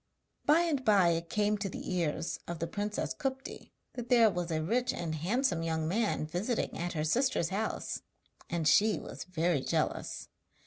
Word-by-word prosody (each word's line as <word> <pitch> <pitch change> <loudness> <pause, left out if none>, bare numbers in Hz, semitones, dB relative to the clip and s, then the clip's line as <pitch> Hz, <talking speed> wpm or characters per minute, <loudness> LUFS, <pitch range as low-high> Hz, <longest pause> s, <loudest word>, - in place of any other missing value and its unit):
By 305 +3 +6
and 310 -6 0
by 200 -6 +5
it 165 0 -1
came 210 0 +1
to 200 -1 -2
the 185 - -5
ears 165 -2 -1
of 170 - -4
the 165 - -2
princess 205 +4 -2
Kupti 265 -1 -5 0.2
that 245 -1 -6
there 230 -4 +6
was 175 -1 -3
a 155 -1 -1
rich 240 +9 +1
and 165 -2 -3
handsome 180 - 0
young 160 -1 -1
man 210 -3 0
visiting 190 +9 -2
at 175 +1 -3
her 155 -2 -1
sister's 235 - +1
house, 210 +3 -2 0.5
and 165 -3 0
she 210 +6 +5
was - - -7
very 170 -4 +1
jealous. - - -2
185 Hz, 175 wpm, -31 LUFS, 165-230 Hz, 0.5 s, By